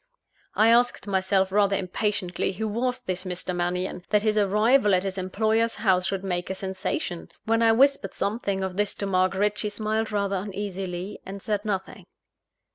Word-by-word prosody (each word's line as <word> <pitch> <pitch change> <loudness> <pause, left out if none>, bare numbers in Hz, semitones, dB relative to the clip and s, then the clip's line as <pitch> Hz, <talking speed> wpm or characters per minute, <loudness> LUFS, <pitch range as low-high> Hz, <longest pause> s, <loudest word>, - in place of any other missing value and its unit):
I 220 +1 +5
asked 240 +1 +3
myself 190 -1 +1
rather 200 0 +3
impatiently, 190 -1 -1
who 220 +4 -3
was 250 +4 -1
this 185 -6 -3
Mr. 180 -1 -4
Mannion, 180 +1 -2
that 210 0 +3
his 215 -1 +2
arrival 210 +2 +4
at 180 - +1
his 195 -1 -3
employer's 220 +4 0
house 190 -3 +2
should 195 -1 -2
make 180 -2 -2
a 190 - -2
sensation? 190 -2 -4 0.2
When 225 +1 +2
I 225 -1 +5
whispered 260 -4 +3
something 200 -2 -1
of 190 -1 -4
this 205 -1 +1
to 200 - -3
Margaret, 195 +2 +1
she 210 - -1
smiled 215 +1 -2
rather 200 -1 0
uneasily, 190 -1 -5
and 195 +1 -7
said 205 0 -2
nothing. 195 -3 -4
200 Hz, 170 wpm, -26 LUFS, 185-215 Hz, 0.2 s, I